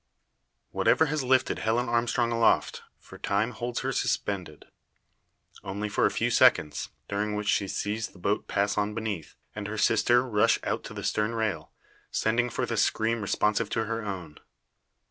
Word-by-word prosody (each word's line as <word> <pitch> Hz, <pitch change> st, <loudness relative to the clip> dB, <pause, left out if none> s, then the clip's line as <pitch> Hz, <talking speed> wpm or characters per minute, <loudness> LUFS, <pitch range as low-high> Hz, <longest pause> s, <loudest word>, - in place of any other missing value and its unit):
Whatever 160 Hz, -, +3 dB
has 155 Hz, -, 0 dB
lifted 130 Hz, 0 st, +2 dB
Helen 115 Hz, +3 st, 0 dB
Armstrong 120 Hz, 0 st, +1 dB
aloft, 115 Hz, -1 st, +2 dB, 0.2 s
for -, -, -14 dB
time 105 Hz, +4 st, 0 dB
holds 120 Hz, +1 st, -4 dB
her 135 Hz, -, -1 dB
suspended. 95 Hz, -, -2 dB, 1.0 s
Only 100 Hz, +1 st, -4 dB
for -, -, +2 dB
a -, -, 0 dB
few -, -, -1 dB
seconds, 75 Hz, -, +3 dB, 0.2 s
during 105 Hz, +1 st, -2 dB
which 105 Hz, 0 st, -3 dB
she 100 Hz, -, +2 dB
sees 105 Hz, +3 st, -2 dB
the -, -, -18 dB
boat 100 Hz, +4 st, -1 dB
pass 100 Hz, +1 st, 0 dB
on 105 Hz, +1 st, -1 dB
beneath, 105 Hz, -8 st, -4 dB, 0.2 s
and 105 Hz, -1 st, -4 dB
her 110 Hz, +1 st, -5 dB
sister 120 Hz, +4 st, +3 dB
rush 105 Hz, -4 st, +3 dB
out -, -, -2 dB
to -, -, -8 dB
the -, -, -6 dB
stern 110 Hz, +2 st, 0 dB
rail, 110 Hz, -3 st, -2 dB, 0.4 s
sending 120 Hz, +2 st, +1 dB
forth -, -, -3 dB
a -, -, -1 dB
scream 115 Hz, +1 st, +1 dB
responsive 105 Hz, +1 st, +1 dB
to 115 Hz, -1 st, -1 dB
her 115 Hz, +1 st, -3 dB
own. 90 Hz, -7 st, -6 dB
110 Hz, 165 wpm, -27 LUFS, 100-115 Hz, 1.0 s, Whatever